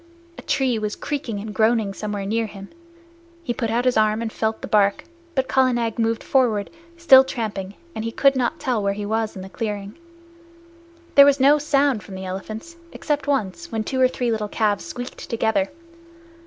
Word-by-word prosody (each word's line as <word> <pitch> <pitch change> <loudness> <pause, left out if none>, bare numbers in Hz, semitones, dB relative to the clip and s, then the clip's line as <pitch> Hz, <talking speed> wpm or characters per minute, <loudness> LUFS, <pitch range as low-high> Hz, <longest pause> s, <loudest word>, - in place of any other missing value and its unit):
A - - -10
tree 255 -4 0
was 210 -1 -3
creaking 270 -8 -4
and 215 0 -7
groaning 220 -2 +2
somewhere 205 0 -4
near 225 +2 0
him. 195 -1 -10 0.7
He 245 - -2
put 230 -2 -2
out 235 +3 0
his 250 -2 +2
arm 215 0 +3
and 225 - -4
felt 220 0 -2
the - - -4
bark, 200 -2 +2 0.3
but 265 -1 +1
Kala 260 -1 +3
Nag 235 -1 -2
moved 225 0 0
forward, 230 -7 +1 0.3
still 270 -6 +8
tramping, 205 -7 -4 0.2
and 220 - -4
he 230 - -3
could 275 +3 +3
not 260 +5 -1
tell 250 -6 0
where 200 0 0
he 205 0 -4
was 220 +1 -1
in 190 - -7
the - - -8
clearing. 205 -1 -4 1.2
There 280 - +9
was 285 0 +4
no 285 +3 +5
sound 280 -5 +2
from 190 - -10
the 190 0 -6
elephants, 215 - -7
except 295 -1 -2
once, 275 - -2
when 220 -1 -1
two 260 +3 -2
or 255 - +7
three 245 -2 -2
little 215 -2 -1
calves 210 -2 0
squeaked 245 +1 -7
together. 230 +5 +1
225 Hz, 195 wpm, -22 LUFS, 210-265 Hz, 1.2 s, There